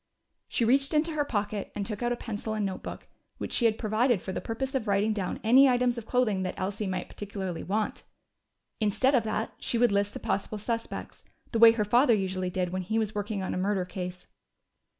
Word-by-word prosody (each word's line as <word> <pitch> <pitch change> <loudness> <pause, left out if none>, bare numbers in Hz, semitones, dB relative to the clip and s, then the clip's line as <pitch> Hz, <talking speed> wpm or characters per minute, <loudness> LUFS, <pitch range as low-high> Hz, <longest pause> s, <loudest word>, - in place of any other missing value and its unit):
She 235 - 0
reached 275 +5 +3
into 315 +2 +2
her 305 -2 +1
pocket 205 -5 -2
and 200 - -2
took 210 0 -4
out 240 0 +1
a - - +1
pencil 220 -2 -4
and 210 -1 0
notebook, 190 -1 -5 0.3
which - - -5
she 240 - +2
had 220 -1 +3
provided 220 +1 +2
for 190 - -6
the - - -3
purpose 265 +4 -3
of 255 -5 -1
writing 205 +2 +2
down 195 -4 -3
any 260 +5 +7
items 245 -1 +2
of 230 -2 -7
clothing 230 -6 +1
that 185 -1 -3
Elsie 195 +2 -2
might 185 -1 -3
particularly 190 -4 -5
want. 210 +3 -2 0.8
Instead 225 +5 +2
of 250 - +5
that, 220 0 -2
she 235 - -1
would 240 -1 +4
list 200 0 0
the - - -4
possible 200 +2 -2
suspects, 230 +2 -4 0.3
the 230 - 0
way 230 0 +9
her 215 -2 0
father 240 +3 +5
usually 185 -2 -1
did 180 -1 -2
when 185 0 -2
he 215 +5 -2
was 215 -1 0
working 205 -1 -3
on - - -2
a - - -2
murder 190 -1 0
case. 180 0 -6
215 Hz, 215 wpm, -28 LUFS, 195-240 Hz, 0.8 s, way